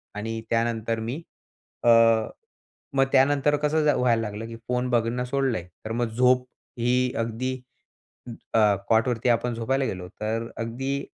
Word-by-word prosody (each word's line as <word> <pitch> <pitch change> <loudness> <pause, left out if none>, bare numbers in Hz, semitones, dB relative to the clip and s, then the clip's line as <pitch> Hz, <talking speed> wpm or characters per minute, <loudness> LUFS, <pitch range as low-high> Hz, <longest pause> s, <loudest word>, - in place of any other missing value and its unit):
आणि 115 +2 -4
त्यानंतर 115 -1 0
मी 115 +4 -3 0.7
अ, 120 - +4 1.0
मग 135 0 +4
त्यानंतर 140 +2 +4
कसं 150 +1 +1
झा 150 - +4
व्हायला 120 -2 +2
लागलं 105 +1 -5
की 115 - -8
फोन 125 0 0
बघणं 120 +1 +1
सोडलय, 130 -7 -1 0.2
तर 110 - -4
मग 120 0 0
झोप 125 +2 +3 0.3
ही 125 +1 +1
अगदी 115 +3 -2 1.0
अ, 105 -2 +5
कॉटवरती 115 +2 +2
आपण 120 0 +1
झोपायला 135 +4 0
गेलो, 90 -6 -4
तर 115 +2 -2
अगदी 135 +5 -3
120 Hz, 140 wpm, -25 LUFS, 115-130 Hz, 1.0 s, अ